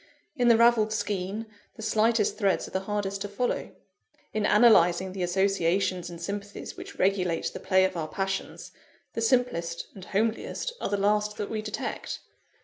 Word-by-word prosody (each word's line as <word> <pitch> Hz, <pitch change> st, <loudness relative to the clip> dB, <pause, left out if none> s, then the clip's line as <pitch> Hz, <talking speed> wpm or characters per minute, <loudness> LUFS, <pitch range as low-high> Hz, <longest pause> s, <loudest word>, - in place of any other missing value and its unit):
In 245 Hz, -4 st, +2 dB
the 230 Hz, -1 st, +7 dB
ravelled 230 Hz, -2 st, +4 dB
skein, 205 Hz, 0 st, -2 dB, 0.3 s
the 220 Hz, -, -9 dB
slightest 220 Hz, 0 st, +2 dB
threads 200 Hz, -4 st, +1 dB
are -, -, -12 dB
the 190 Hz, -, 0 dB
hardest 200 Hz, -1 st, -2 dB
to 205 Hz, -, -2 dB
follow. 240 Hz, +5 st, -2 dB, 0.6 s
In 215 Hz, -1 st, +1 dB
analysing 190 Hz, -5 st, +5 dB
the 190 Hz, -, -5 dB
associations 185 Hz, 0 st, +1 dB
and 170 Hz, -1 st, -9 dB
sympathies 200 Hz, +3 st, -6 dB
which -, -, -10 dB
regulate 185 Hz, -3 st, +1 dB
the -, -, -6 dB
play 190 Hz, 0 st, +3 dB
of 190 Hz, -, -2 dB
our 160 Hz, -2 st, -2 dB
passions, 195 Hz, +4 st, -4 dB, 0.4 s
the 230 Hz, -, -3 dB
simplest 225 Hz, -9 st, 0 dB
and 190 Hz, -2 st, -10 dB
homeliest 225 Hz, -, -1 dB
are -, -, -1 dB
the 205 Hz, -, 0 dB
last 210 Hz, +1 st, +1 dB
that 205 Hz, -, -4 dB
we 215 Hz, -1 st, -2 dB
detect. 215 Hz, 0 st, -4 dB
200 Hz, 165 wpm, -27 LUFS, 185-215 Hz, 0.6 s, the